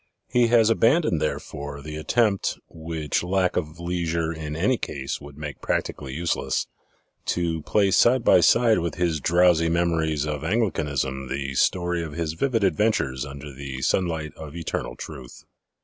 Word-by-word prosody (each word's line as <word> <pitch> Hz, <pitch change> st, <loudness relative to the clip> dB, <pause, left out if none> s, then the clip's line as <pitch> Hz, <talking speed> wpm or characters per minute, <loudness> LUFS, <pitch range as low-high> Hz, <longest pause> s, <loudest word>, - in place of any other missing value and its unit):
He 125 Hz, -2 st, +3 dB
has 115 Hz, -1 st, +5 dB
abandoned, 115 Hz, -, +3 dB
therefore, 70 Hz, -1 st, -4 dB
the 75 Hz, 0 st, -6 dB
attempt 100 Hz, +6 st, +1 dB
which 80 Hz, -2 st, -3 dB
lack 90 Hz, +1 st, +1 dB
of 80 Hz, 0 st, -3 dB
leisure 85 Hz, -1 st, -1 dB
in 75 Hz, -2 st, -5 dB
any 105 Hz, +10 st, +1 dB
case 70 Hz, +2 st, -4 dB
would 70 Hz, 0 st, -11 dB
make 75 Hz, -2 st, -7 dB
practically 70 Hz, -2 st, -2 dB
useless 85 Hz, +2 st, -1 dB, 0.6 s
to 85 Hz, -2 st, -1 dB
place 100 Hz, +4 st, +2 dB
side 120 Hz, 0 st, +4 dB
by -, -, +6 dB
side 115 Hz, -4 st, +4 dB
with 85 Hz, 0 st, -3 dB
his 85 Hz, -4 st, 0 dB
drowsy 85 Hz, +1 st, +4 dB
memories 80 Hz, -3 st, +1 dB
of 75 Hz, -1 st, -3 dB
Anglicanism 75 Hz, -, -1 dB
the 70 Hz, 0 st, -3 dB
story 90 Hz, +5 st, +1 dB
of 80 Hz, -3 st, -6 dB
his 80 Hz, -1 st, -2 dB
vivid 115 Hz, +4 st, 0 dB
adventures 95 Hz, -, +1 dB
under 70 Hz, +1 st, -9 dB
the 65 Hz, -1 st, -6 dB
sunlight 80 Hz, -4 st, 0 dB
of 80 Hz, -1 st, -9 dB
Eternal 85 Hz, -2 st, -4 dB
Truth. 65 Hz, -6 st, -9 dB
80 Hz, 150 wpm, -24 LUFS, 75-90 Hz, 0.6 s, by